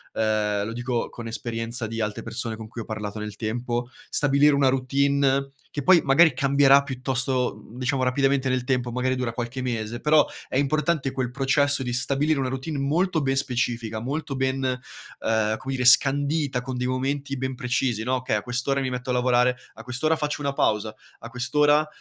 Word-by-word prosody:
ehm, 105 -2 0
lo 115 - -5
dico 120 0 -2
con 115 -1 -8
esperienza 115 0 -3
di 115 +1 -4
altre 105 -1 -3
persone 115 -1 -3
con 110 0 -8
cui 115 +1 -7
ho - - -8
parlato 110 -1 -5
nel 105 -1 -6
tempo, 120 +2 -2 0.2
stabilire 145 +1 +3
una 140 -1 +3
routine 140 +1 +1 0.2
che 145 - -2
poi, 175 +4 +6
magari, 150 +3 +5
cambierà 140 0 +5
piuttosto, 130 -4 -2
diciamo, 130 +1 -1
rapidamente 135 +1 +1
nel 130 -1 0
tempo, 125 -1 -1
magari 125 +2 0
dura 125 -2 -2
qualche 120 +2 -4
mese, 120 -1 -3
però 150 0 +5 0.2
è - - -2
importante 150 +1 +1
quel 130 -2 -3
processo 140 +2 +2
di 125 -2 -3
stabilire 140 +5 +1
una 130 -1 -1
routine 135 +4 -4
molto 160 +5 +1
ben 135 0 +1
specifica, 120 -4 -2
molto 145 +4 -4
ben, 130 0 -1
ehm, 115 -3 -2
come 135 +3 -5
dire, 130 -1 -1
scandita, 140 +1 +3
con 125 0 -5
dei 125 - -2
momenti 135 +2 -2
ben 130 0 -3
precisi, 125 -2 -1
no, 130 +3 0
"Okay 130 -3 -1
a - - -3
quest'ora 130 +3 -1
mi 130 - -1
metto 125 0 -5
a - - +1
lavorare, 125 0 +3 0.2
a - - -11
quest'ora 125 +6 +2
faccio 150 -1 -3
una 140 -1 -1
pausa, 110 -4 0 0.3
a 115 - -9
quest'ora, 145 +5 +2
130 Hz, 185 wpm, -24 LUFS, 120-140 Hz, 0.3 s, poi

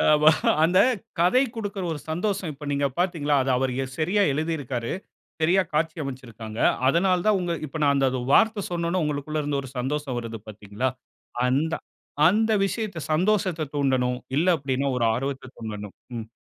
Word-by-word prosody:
அ - - +2
ஆமா 150 +1 +6 0.3
அந்த 180 +3 +4 0.4
கதை 185 +10 +4
குடுக்கிற 205 -3 -4
ஒரு 150 - -4
சந்தோஷம் 185 +1 -1
இப்ப 145 +1 -11
நீங்க 140 0 +1
பாத்தீங்களா? 165 -5 +1
அதை 135 - -1
அவர் 130 0 0 0.3
சரியா 185 +6 +2
எழுதியிருக்காரு. 140 -6 -2 0.5
சரியா 180 +4 +4
காட்சி 155 +2 0
அமைச்சிருக்காங்க. 115 -5 -7 0.3
அதனால 180 +5 +3
தான் 210 -2 +4
உங்க 175 -1 -1
இப்ப 155 +2 -6
நான் 140 -1 +4
அந்த 135 -1 +3 0.2
வார்த்த 220 0 +4
சொன்ன 170 -1 -1
உடனே 185 -1 +1
உங்களுக்குள் 150 +1 -2
இருந்து 145 -1 -1
ஒரு 130 - -9
சந்தோசம் 135 0 -2
வருது 115 -2 -6
பாத்தீங்களா? 105 +4 -3 0.6
அந்த 145 +6 +1 0.6
அந்த 220 +4 +2
விஷயத்த 205 -4 -3
சந்தோசத்த 185 -1 +1
தூண்டணும். 130 -3 +1 0.2
இல்ல, 160 +5 +2
அப்டின்னா 135 0 -1
ஒரு 120 - +1
ஆர்வத்த 135 +1 -4
தூண்டணும். 105 -3 -6 0.3
ம். 110 - -7
150 Hz, 155 wpm, -25 LUFS, 130-180 Hz, 0.6 s, ஆமா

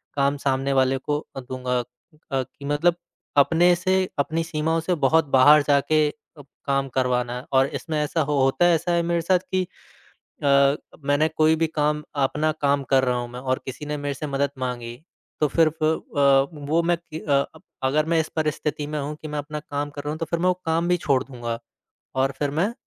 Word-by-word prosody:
काम 140 0 +1
सामने 135 0 0
वाले 130 0 +3
को 145 +3 -2 0.2
अ, - - -4
दूँगा 125 0 -2
अ, 120 - -2 0.5
कि 135 +1 -3
मतलब 150 +4 +2 0.4
अपने 170 +5 +5
से 185 +1 +1
अपनी 160 +3 0
सीमाओं 160 0 -1
से 175 +2 0
बहुत 160 0 +3
बाहर 145 +3 +7
जा 140 -1 +5
के 155 -1 +4
अ, - - -6 0.5
काम 135 0 0
करवाना 125 -1 0
है 125 - -8
और 135 0 +5
इसमें 155 +1 -3
ऐसा 160 +2 -1
हो 145 -1 0
होता 135 +6 +3
है 175 - +5
ऐसा 170 +2 -1
है 170 0 +2
मेरे 170 0 0
साथ 180 +2 +3 0.2
कि 185 - +2 0.8
अ, 140 0 +5 0.3
मैंने 145 +2 +3
कोई 155 +1 +4
भी 165 0 +1
काम 150 0 +1 0.2
अपना 155 +3 0
काम 140 -1 +2
कर 135 -1 +5
रहा 125 -1 +1
हूँ 120 0 -5
मैं 125 - -7
और 130 0 -1
किसी 135 +3 -7
ने 150 0 -3
मेरे 145 0 -3
से 150 +2 -5
मदद 140 0 0
माँगी, 120 -2 -4 0.4
तो 150 - +3
फिर 160 +3 +3
फ 155 0 -8
अ, 140 -3 +3 0.2
वो 165 +2 +3
मैं 175 0 +2
कि 160 -2 -9
अ, 140 -3 +2 0.4
अगर 150 +3 +2
मैं 165 0 +2
इस 160 - -1
परिस्थिति 150 -1 -1
में 150 0 -3
हूँ 145 +2 -4
कि 155 - -6
मैं 150 0 -3
अपना 150 +1 -5
काम 145 -1 -4
कर 145 0 -7
रहा 145 - -4
हूँ 155 - -4
तो 165 - -2
फिर 170 +1 -2
मैं 180 - +1
वो 180 - +4
काम 165 +1 +1
भी 180 - +3
छोड़ 135 -5 +1
दूँगा। 120 -3 -5 0.6
और 135 +1 +2
फिर 145 -1 0
मैं 175 +10 0
145 Hz, 220 wpm, -24 LUFS, 135-160 Hz, 0.8 s, बाहर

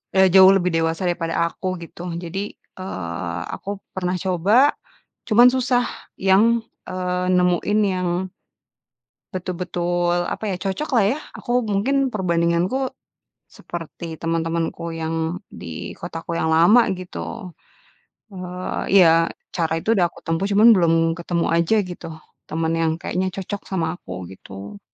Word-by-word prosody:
eee, 190 0 +6
jauh 190 +1 +8
lebih 180 -2 +2
dewasa 165 +2 0
daripada 165 -1 -1
aku, 185 +2 -4
gitu. 175 +2 -9
Jadi, 195 +4 -4 0.3
eee, 85 - -4
aku 200 0 -6 0.2
pernah 185 -1 -1
coba, 200 - +4 0.6
cuman 240 +3 +7
susah, 250 -1 +1 0.3
yang, 210 +5 +4 0.3
eee, 180 0 -2
nemuin 180 +3 +2
yang 180 0 -1 1.1
betul 185 0 -3
betul, 175 -1 0 0.2
apa - - -5
ya, 195 - -1
cocoklah 230 +3 +1
ya, 295 - -3 0.2
aku - - -9 0.2
mungkin, 265 +7 +1
perbandinganku, 180 +5 0 0.7
seperti 165 -1 -7
teman-temanku 165 +1 -2
yang 160 0 -2 0.5
di 80 -2 -6
kotaku 165 0 -6
yang 160 - +1
lama, 170 +9 +5
gitu. 185 +1 -7 0.8
Eee, 180 -1 -5
iya, 180 -4 +8 0.5
cara 165 -2 0
itu 165 - -6
udah 185 -6 +4
aku - - -17
tempuh, 165 +4 0
cuman 215 +4 +7
belum 170 -3 +3 0.3
ketemu 170 0 -1
aja 170 +6 +2 0.2
gitu, 175 - -8 0.4
temen 160 +1 -1
yang 160 -1 +2
kayaknya 185 +2 -1
cocok 195 +1 -4
sama 180 -4 0
aku, 90 - -9 0.2
gitu. 100 +2 -10
180 Hz, 130 wpm, -22 LUFS, 165-195 Hz, 1.1 s, jauh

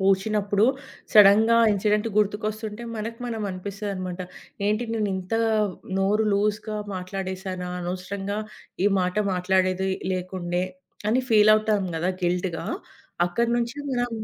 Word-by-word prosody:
కోషీనప్పుడు 200 +2 +2 0.5
సడెన్‌గా 215 +2 +7 0.2
ఇన్సిడెంట్ 210 +2 +1
గుర్తుకొస్తుంటే, 215 +1 -1
మనకు 225 +2 -5
మనం 225 -3 -3
అనిపిస్తదన్నమాట, 185 -1 -5 0.5
ఏంటి 215 +3 +1
నేను 215 -2 0
ఇంత 185 +4 -4 0.6
నోరు 205 +3 +2
లూజ్‌గా 210 +1 0 0.2
మాట్లాడేసానా, 185 0 -4
అనవసరంగా 195 +3 -4 0.5
ఈ - - +6
మాట 180 +1 -1 0.2
మాట్లాడేది 185 +1 +1 0.2
లేకుండే 180 -1 -2 0.4
అని 250 +4 +2
ఫీలవుతాం 215 -1 +5
కదా! 175 +3 0
గిల్ట్‌గా 175 -2 -1 0.6
అక్కడి 235 +7 0
నుంచి 240 +3 -2
మనం 245 -1 0
200 Hz, 105 wpm, -25 LUFS, 185-215 Hz, 0.6 s, సడెన్‌గా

